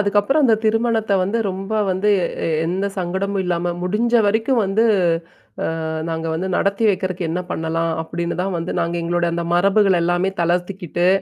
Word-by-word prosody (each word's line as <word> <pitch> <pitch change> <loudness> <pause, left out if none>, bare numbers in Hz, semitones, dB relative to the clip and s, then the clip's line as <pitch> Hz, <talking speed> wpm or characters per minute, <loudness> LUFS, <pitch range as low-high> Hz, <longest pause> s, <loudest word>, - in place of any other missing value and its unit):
அதுக்கப்புறம் 205 +9 +2
அந்த 230 -4 +5
திருமணத்த 225 -1 +1
வந்து, 200 +5 0
ரொம்ப 195 +3 -6 0.2
வந்து, 190 +3 0 0.4
எ - - 0 0.2
எந்த 185 +4 -1
சங்கடமும் 190 +2 -1
இல்லாம 175 0 -1
முடிஞ்ச 215 +6 0
வரைக்கும் 225 +4 +2
வந்து, 200 +4 +2 1.0
அ - - -3 0.2
நாங்க 160 0 -3
வந்து 180 +4 -2
நடத்தி 200 +3 0
வெக்கிறக்கு 185 -3 -1
என்ன 175 +3 -1
பண்ணலாம் 165 +1 -1
அப்டின்னு 170 +2 -4
தான் 190 -1 -2
வந்து 165 - -3
நாங்க 170 +1 -1
எங்களோட 175 0 0
அந்த 170 0 -2
மரபுகள் 195 0 +3
எல்லாமே 175 +2 +1
தளர்த்திக்கிட்டு, 175 0 -1
185 Hz, 155 wpm, -20 LUFS, 175-205 Hz, 1.0 s, அந்த